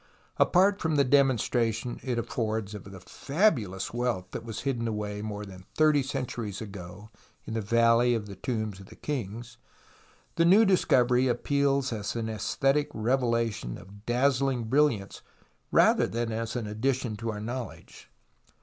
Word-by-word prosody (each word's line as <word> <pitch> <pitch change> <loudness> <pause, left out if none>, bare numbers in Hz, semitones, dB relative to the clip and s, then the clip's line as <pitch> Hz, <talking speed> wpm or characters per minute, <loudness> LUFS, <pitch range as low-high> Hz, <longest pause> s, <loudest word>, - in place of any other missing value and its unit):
Apart 195 +2 +4
from 160 -2 0
the 140 - +4
demonstration 120 -3 +1
it 125 -3 -2
affords 110 -3 -2
of 105 - -8
the 95 -1 -10
fabulous 120 - 0
wealth 120 -6 -1
that - - -5
was 115 -1 -6
hidden 120 -4 -1
away 105 -1 -3
more 105 -1 -5
than 95 -1 -12
thirty 155 -2 +4
centuries 125 -7 -4
ago 100 0 -9 0.3
in 110 - -6
the 110 - -1
\^alley 115 +3 +3
of 110 -2 -3
the 100 -1 -9
Tombs 110 -1 -3
of 95 - -12
the - - -14
Kings, 120 -3 -5 0.8
the - - +4
new 195 +6 +6
discovery 130 - +3
appeals 140 +1 +1
as 105 0 -4
an 115 -1 -2
{esthetic 135 +7 0
revelation 115 - 0
of 100 +3 -15
dazzling 130 0 +1
brilliance 120 -4 +1 0.5
rather - - +4
than 115 0 -2
as 115 +1 -3
an 120 -3 -2
addition 120 +2 -1
to 115 +1 -4
our 105 - -6
knowledfife. 110 -7 -7
115 Hz, 150 wpm, -28 LUFS, 105-135 Hz, 0.8 s, new